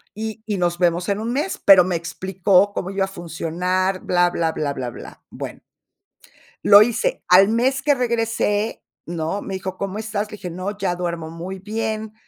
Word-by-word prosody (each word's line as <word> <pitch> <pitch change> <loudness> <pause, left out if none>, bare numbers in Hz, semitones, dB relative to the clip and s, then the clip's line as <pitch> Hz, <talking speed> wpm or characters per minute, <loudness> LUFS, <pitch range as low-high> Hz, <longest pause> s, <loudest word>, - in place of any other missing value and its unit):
Y 220 +1 -5
y 210 -2 -1
nos 175 -1 0
vemos 175 0 +1
en 200 0 0
1 225 +2 -3
mes", 300 +8 -2
pero 190 -2 +8
me 180 0 -1
explicó 190 +3 +1
cómo 185 - -3
iba 195 -1 0
a - - -9
funcionar, 180 +2 -2
bla, 175 0 +2
bla, 165 -2 0
bla, 145 -2 -2
bla, 130 -3 -4
bla. - - -11
Bueno - - -7 1.0
lo 205 0 +9
hice. 240 - 0
Al 190 +2 +7
mes 255 +4 +1
que 290 0 +3
regresé, 230 -3 -1 0.2
¿no? 165 +3 -3
Me 195 - -5
dijo: 190 0 -5
"¿Cómo 200 +1 -4
estás?". 215 -1 -3
Le 210 - -7
dije: 180 - -7
"No, 185 +4 -5
ya 190 -3 -1
duermo 170 -2 -4
muy 175 +4 -7
bien" 220 +2 -4
195 Hz, 185 wpm, -21 LUFS, 175-215 Hz, 1.0 s, lo